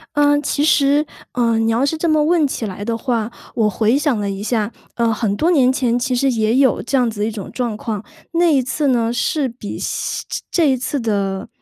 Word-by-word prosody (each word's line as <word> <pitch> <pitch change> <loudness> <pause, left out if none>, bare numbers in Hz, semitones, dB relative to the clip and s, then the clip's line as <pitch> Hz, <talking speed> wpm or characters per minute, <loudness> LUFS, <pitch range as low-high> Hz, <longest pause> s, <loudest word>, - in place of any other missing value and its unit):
嗯， 290 0 +4
其 290 0 -1
实， 290 0 +3 0.3
嗯， 230 -2 +1
你 225 - +2
要 240 +4 +2
是 300 +3 0
这 330 +1 0
么 305 -1 +3
问 325 -1 +3
起 240 -4 -4
来 200 0 -6
的 230 +1 -2
话， 230 -1 -1 0.2
我 220 -3 +2
回 220 +5 +2
想 285 -6 +1
了 200 -1 -2
一 195 0 -4
下， 220 0 -1 0.2
呃， 230 -1 +1
很 215 -2 -1
多 330 +11 +2
年 260 -6 +4
前 250 -3 +1
其 250 +1 -1
实 270 +2 +2
也 220 0 +1
有 265 -2 +3
这 270 - 0
样 245 -2 +2
子 210 -2 -6
的 - - +2
一 - - -2
种 205 -3 -7
状 235 -4 -2
况。 215 -2 -4 0.3
那 335 -2 +3
一 270 - +4
次 285 +3 -1
呢， 235 -2 +1
是 270 +3 0
比 230 -4 -7
西 - - -3
这 - - -4
这 315 -6 +3
一 - - +2
次 270 +3 -2
的， 200 -4 -1
245 Hz, 255 characters per minute, -19 LUFS, 220-285 Hz, 0.3 s, 嗯